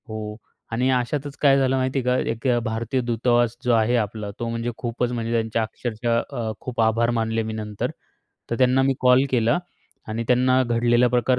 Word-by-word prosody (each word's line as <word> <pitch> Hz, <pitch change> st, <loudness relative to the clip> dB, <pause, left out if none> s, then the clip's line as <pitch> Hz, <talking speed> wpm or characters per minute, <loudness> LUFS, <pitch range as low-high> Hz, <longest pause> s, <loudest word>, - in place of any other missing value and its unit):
हो, 110 Hz, -1 st, -5 dB, 0.3 s
आणि 125 Hz, +3 st, +1 dB
अशातच 135 Hz, +3 st, -1 dB
काय 140 Hz, -2 st, +5 dB
झालं 135 Hz, -1 st, +2 dB
माहिती 130 Hz, +1 st, 0 dB
आहे -, -, -3 dB, 0.2 s
का, -, -, -3 dB
एक 115 Hz, +3 st, -4 dB
अ, -, -, +2 dB
भारतीय 115 Hz, +4 st, -1 dB
दूतावास 120 Hz, 0 st, +1 dB
जो 125 Hz, -, +2 dB
आहे 115 Hz, +2 st, +3 dB
आपला. 105 Hz, -2 st, -2 dB
तो 120 Hz, -, -2 dB
म्हणजे 115 Hz, +1 st, -2 dB
खूपच 120 Hz, 0 st, -2 dB
म्हणजे 115 Hz, -1 st, -3 dB
त्यांचे 115 Hz, -1 st, 0 dB
अक्षरशः 115 Hz, +1 st, -1 dB
अ, 115 Hz, -2 st, -3 dB
खूप 125 Hz, -2 st, -3 dB
आभार 115 Hz, +1 st, +2 dB
मानले 115 Hz, 0 st, 0 dB
मी 110 Hz, 0 st, -4 dB
नंतर. 105 Hz, -1 st, -4 dB, 0.6 s
तर 115 Hz, -, 0 dB
त्यांना 130 Hz, +1 st, +4 dB
मी 135 Hz, 0 st, +2 dB
कॉल 125 Hz, +1 st, +5 dB
केला 120 Hz, +2 st, +2 dB, 0.5 s
आणि 110 Hz, +2 st, -2 dB
त्यांना 130 Hz, +1 st, +4 dB
घडलेला 120 Hz, 0 st, +3 dB
प्रकार 125 Hz, +1 st, +2 dB
120 Hz, 190 wpm, -23 LUFS, 115-125 Hz, 0.6 s, काय